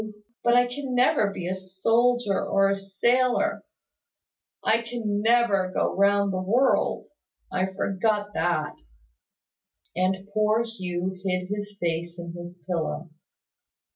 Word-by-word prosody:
But 240 0 +4
I 245 0 +5
can 255 +1 -5
never 245 -4 +3
be 180 -3 -5
a 185 - -1
soldier 210 +4 +1
or 195 0 +2
a - - +2
sailor 240 +6 +1 1.0
I 225 +1 +3
can 230 -3 -2
never 220 -5 +3
go - - 0
round 200 0 +3
the 185 - -1
world! 240 +8 +2 0.5
I 185 +1 0
forgot 205 +2 -1
that." 160 -5 0 1.2
And 190 +2 0
poor 215 +1 +2
Hugh 185 -5 -3
hid 185 -1 -1
his 205 0 -5
face 170 0 -2
in 170 0 -7
his 175 0 -10
pillow. 170 -2 -3
195 Hz, 125 wpm, -26 LUFS, 185-230 Hz, 1.2 s, I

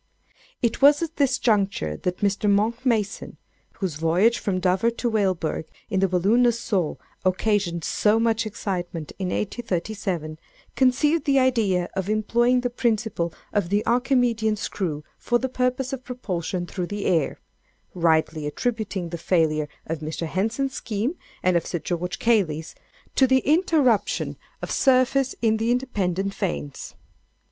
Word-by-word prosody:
"It 235 +2 0
was 290 +3 +6
at 330 0 -5
this 275 -3 +2
juncture 200 - +1
that 180 - -3
Mr. 205 +1 +1
Monck 220 +4 +1
Mason 220 -5 -1 0.4
(whose 180 -7 -3
voyage 175 +9 +3
from 190 -3 -1
Dover 185 +5 +2
to 235 +1 -2
Weilburg 185 -7 0 0.3
in 190 - +1
the 195 - +3
balloon, 190 +6 +3
"Nassau," 230 -8 +1 0.3
occasioned 185 -2 +1
so 215 +1 +2
much 225 -1 +1
excitement 175 -6 -4
in 190 - -1
1837,) 185 -6 -3 0.4
conceived 285 +4 +3
the 275 -1 +3
idea 220 -9 +2
of 190 0 -2
employing 235 +4 +2
the 245 0 -2
principle 220 -8 0 0.2
of 205 -5 0
the 205 +2 +1
Archimedean 240 -3 +2
screw 170 -7 -3 0.2
for 240 - +1
the 260 - -2
purpose 255 +1 -1
of 260 -1 -5
propulsion 185 -8 -3
through 180 0 -4
the 205 +1 -4
air—rightly 160 -1 -1
attributing 205 -1 -2
the 170 0 -5
failure 155 -4 +1 0.2
of 165 -1 -3
Mr. 155 +2 -4
Henson's 225 - -1
scheme, 225 +5 -2 0.3
and 185 -1 +3
of 170 - +1
Sir 175 - -2
George 175 +2 -3
Cayley's, 170 -9 +1 0.4
to 265 - +4
the 260 0 +3
interruption 300 - +2 0.3
of - - -4
surface 265 0 +3
in 220 -1 +3
the 225 +1 -1
independent 195 -7 0
vanes. 70 - -4
210 Hz, 140 wpm, -24 LUFS, 180-245 Hz, 0.4 s, was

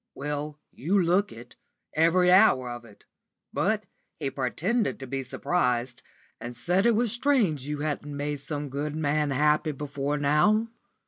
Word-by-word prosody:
"Well, 145 +1 -4
you 185 +9 0
look 185 +3 +2
it, 120 +1 -13 0.4
every 180 +3 +4
hour 135 - +5
of 120 0 -8
it. 105 -3 -18 0.5
But - - 0 0.4
he 135 - -2
pretended 185 - -1
to 135 - -6
be 135 +1 -3
surprised, 125 -4 -1 0.4
and 120 0 -7
said 180 - +2
it 235 - +4
was 235 0 +1
strange 225 - +1
you 150 0 -3
hadn't 145 -1 -3
made 145 0 -3
some 145 0 -5
good 145 +2 -3
man 150 -1 0
happy 150 +2 +2
before 145 0 -3
now." 150 +11 +3
150 Hz, 150 wpm, -27 LUFS, 135-180 Hz, 0.5 s, hour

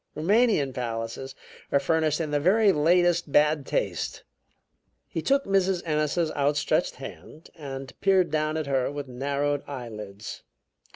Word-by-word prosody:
"Roumanian 190 - +2
palaces 115 +2 -4 0.4
are 140 - +4
furnished 160 0 +1
in 155 -3 -2
the 145 - +2
very 200 +6 +4
latest 175 0 +2
bad 150 -1 +3
taste." - - -2 0.8
He - - -4
took 275 0 +2
Mrs. 195 -2 +1
Ennis's 155 +1 0
outstretched 145 0 +1
hand 155 - -11
and 135 -3 -7
peered 190 -4 +3
down 155 0 0
at 155 - -2
her 135 -1 0
with 145 -1 -5
narrowed 140 +3 -1
eyelids. 110 -6 -7
150 Hz, 130 wpm, -26 LUFS, 135-175 Hz, 0.8 s, are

